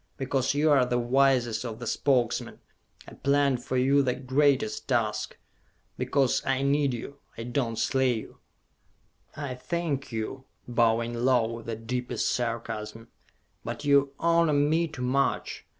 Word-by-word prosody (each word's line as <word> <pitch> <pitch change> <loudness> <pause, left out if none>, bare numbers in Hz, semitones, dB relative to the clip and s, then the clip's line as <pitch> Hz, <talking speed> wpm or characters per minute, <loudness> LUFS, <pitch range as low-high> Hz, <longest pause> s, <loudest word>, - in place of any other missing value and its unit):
Because 135 0 0
you 150 +1 +3
are 135 -3 +5
the 125 0 0
wisest 120 -2 +2
of 115 -3 -5
the 120 - -7
Spokesmen, 125 0 0 0.5
I - - -11
planned 140 -2 +1
for 130 - -2
you 135 +3 +4
the 125 -2 0
greatest 135 -3 +1
task! 110 -4 -1 0.6
Because 135 -3 +1
I 135 0 0
need 140 0 +2
you... 140 +4 -8 0.2
I 115 - -5
do 120 +4 -1
not 115 - -6
slay 130 -2 +2
you!" 110 - -8 1.0
"I 140 -3 -4
thank 145 0 -3
you," 115 +4 -4 0.2
bowing 115 -1 +1
low, 120 -1 +2
with 115 0 -9
the 115 - -2
deepest 120 +1 -2
sarcasm, 115 -2 -4 0.5
"but 145 - -6
you 140 -1 +3
honor 170 -2 +3
me 155 +4 +2
too 140 -5 -7
much! 135 +2 -1
130 Hz, 150 wpm, -27 LUFS, 120-140 Hz, 1.0 s, are